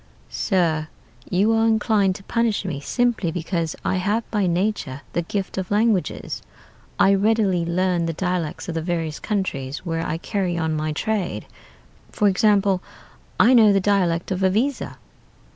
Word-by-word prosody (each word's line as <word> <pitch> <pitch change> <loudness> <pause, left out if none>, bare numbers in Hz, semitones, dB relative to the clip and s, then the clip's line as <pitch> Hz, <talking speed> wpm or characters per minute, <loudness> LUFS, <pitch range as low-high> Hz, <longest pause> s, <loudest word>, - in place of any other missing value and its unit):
"'Sir, 165 -6 0 0.4
you 200 +5 +3
are 225 0 +3
inclined 210 -3 +2
to 195 - -10
punish 230 -2 0
me 155 -7 -3
simply 240 - 0
because 165 -1 -2
I - - +1
have 205 +5 0
by 205 -4 +1
nature 170 -6 -1
the 175 - +1
gift 190 +2 -3
of 185 - -4
languages. 210 -2 0 0.6
I 195 - +5
readily 200 -3 +2
learn 175 0 0
the 165 - -2
dialects 180 -2 -2
of 170 - -3
the 165 - -2
various 165 -2 -2
countries 150 - -3
where 165 -1 -2
I 160 - -2
carry 180 -1 -2
on 160 -1 -1
my 155 0 -1
trade. 205 +3 -2 0.7
For 210 - +2
example, 200 -1 +3 0.6
I 250 - +6
know 220 -4 +7
the 195 - +3
dialect 185 -3 +1
of 185 0 -1
Iviza.' 225 +9 0
190 Hz, 155 wpm, -22 LUFS, 170-210 Hz, 0.7 s, know